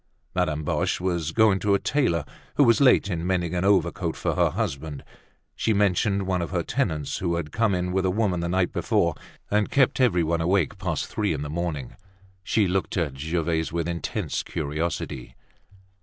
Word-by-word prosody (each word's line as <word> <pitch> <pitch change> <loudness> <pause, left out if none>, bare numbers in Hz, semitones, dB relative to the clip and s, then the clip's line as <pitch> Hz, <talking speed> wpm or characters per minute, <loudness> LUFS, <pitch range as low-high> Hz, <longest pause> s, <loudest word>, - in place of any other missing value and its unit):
Madame 80 -4 0
Boche - - 0
was 85 -4 -1
going 110 -4 +4
to 100 +1 +2
a - - +1
tailor 105 - +1 0.3
who 145 - +5
was 115 0 +4
late 130 -6 +5
in 85 -4 -2
mending 90 -2 0
an 90 0 0
overcoat 90 -4 +1
for - - -1
her - - +3
husband. 70 +1 -4 0.5
She 110 - +1
mentioned 100 0 +2
one 95 -1 0
of 85 - -3
her 85 -2 -1
tenants 80 - -2
who 85 -2 0
had 80 -3 -4
come 110 -4 +1
in 90 0 -1
with 95 0 +1
a - - +2
woman 95 -2 0
the 85 0 -2
night 90 0 +1
before - - +1 0.4
and 105 0 +2
kept 135 -1 +3
everybody 85 -8 +2
awake 85 -2 +1
past - - -2
three 105 -5 -1
in 75 -1 -3
the 75 - -5
morning. 80 -6 -3 0.5
She 105 0 +2
looked 95 +2 -1
at 80 -6 0
Gervaise 80 +2 -1
with 85 0 -2
intense 85 -1 -2
curiosity. 75 -4 -4
90 Hz, 185 wpm, -25 LUFS, 80-100 Hz, 0.5 s, who